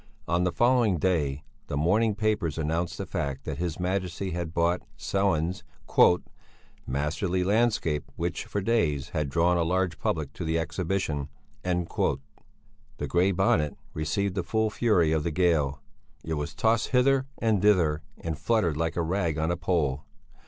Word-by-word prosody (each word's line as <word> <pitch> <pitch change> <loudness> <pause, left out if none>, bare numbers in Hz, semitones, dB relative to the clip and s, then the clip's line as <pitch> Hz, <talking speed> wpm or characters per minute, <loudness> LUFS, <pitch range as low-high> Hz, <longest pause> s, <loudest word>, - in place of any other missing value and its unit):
On 85 +1 +1
the 90 - +1
following 120 -5 +3
day 75 -5 0 0.2
the 70 - -3
morning 105 +8 +2
papers 105 -8 0
announced 80 +2 -1
the - - -4
fact 70 -1 -3
that 75 -2 -5
his 85 -1 -2
Majesty 90 0 -2
had 85 -1 -3
bought 85 +1 +1 0.2
Sellén's 90 -3 0 1.2
"masterly 80 +7 -1
landscape 100 -8 +1
which, 85 0 -3
for 100 - -2
days, 85 -11 +1
had 75 -4 -2
drawn 85 +4 +2
a 85 - +2
large 90 +1 0
public - - -2
to - - -6
the 80 0 0
Exhibition." 80 -2 -2 0.3
The 90 -6 0 0.9
Grey 90 +3 +3
Bonnet 80 -6 +1 0.2
received 90 +6 -1
the 95 - -1
full 110 +4 0
fury 100 -7 +2
of 80 -1 +2
the 85 - -1
gale; 75 -5 +1 0.4
it 80 - -3
was 75 -1 -3
tossed 115 0 +2
hither 135 +1 +3
and 110 -4 +1
thither, 85 -7 +3 0.2
and 80 -1 -4
fluttered 100 -10 +1
like 80 +1 -1
a 85 - 0
rag 85 -2 0
on 80 +2 0
a - - +1
pole. 75 -6 0
85 Hz, 155 wpm, -27 LUFS, 80-100 Hz, 1.2 s, following